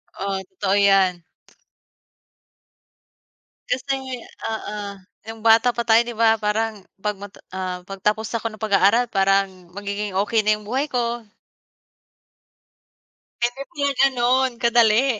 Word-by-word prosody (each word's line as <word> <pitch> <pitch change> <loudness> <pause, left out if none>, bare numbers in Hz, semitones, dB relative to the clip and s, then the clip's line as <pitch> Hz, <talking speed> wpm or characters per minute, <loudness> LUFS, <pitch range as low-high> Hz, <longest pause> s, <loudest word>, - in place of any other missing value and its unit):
Oo, 195 0 -2
totoo 190 +1 -1
'yan. 195 -3 +3 2.4
Kasi 260 -1 -3 0.2
oo, 220 -1 -4 0.5
nung 225 0 -8
bata 230 +2 +5
pa 235 - -1
tayo 225 -1 +5
'di 240 - -5
ba 225 0 +3
parang 215 +1 -1 0.2
'pag 210 -2 -2
mata 205 0 -11
ah, 185 -1 -4
'pag 195 +1 -9
tapos 210 +2 0
ako 230 -1 -2
ng 215 - -12
pag-aaral 215 +3 +3
parang 195 -2 +1
magiging 200 0 -4
okey 220 +2 +1
na 215 0 +2
yung 210 - -11
buhay 260 +8 -1
ko. 240 -4 -2 2.1
Hindi 245 +3 -1
pala 285 -4 0
ganun 260 0 +3
kadali. 235 0 +4
220 Hz, 120 wpm, -22 LUFS, 200-240 Hz, 2.4 s, bata